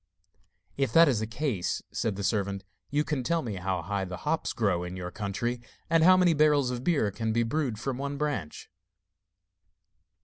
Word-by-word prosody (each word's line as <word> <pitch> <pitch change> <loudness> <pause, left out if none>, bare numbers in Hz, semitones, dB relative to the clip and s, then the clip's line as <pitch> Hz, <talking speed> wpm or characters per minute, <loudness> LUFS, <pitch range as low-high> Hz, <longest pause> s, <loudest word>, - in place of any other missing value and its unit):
'If 135 -1 +1
that 165 0 +8
is 125 -6 +2
the 110 - -2
case,' 115 - -2
said 110 -4 -1
the 100 - -5
servant, 100 -1 -1 0.3
'you 145 +1 +1
can 150 -4 -2
tell 165 +5 0
me 105 -5 -4
how 90 -1 -2
high 100 +2 -2
the 90 -1 -5
hops - - 0
grow 85 - 0
in 90 +1 -6
your 90 -1 -5
country, 115 +5 -3 0.3
and 165 -1 +5
how 185 +2 +7
many 180 -2 +4
barrels 145 -4 +3
of 125 0 -4
beer 140 -12 +2
can 110 +2 -2
be 115 +1 +2
brewed 125 -2 -1
from 130 +1 -3
one 140 +1 -3
branch? 140 - -3
120 Hz, 190 wpm, -28 LUFS, 100-145 Hz, 0.3 s, that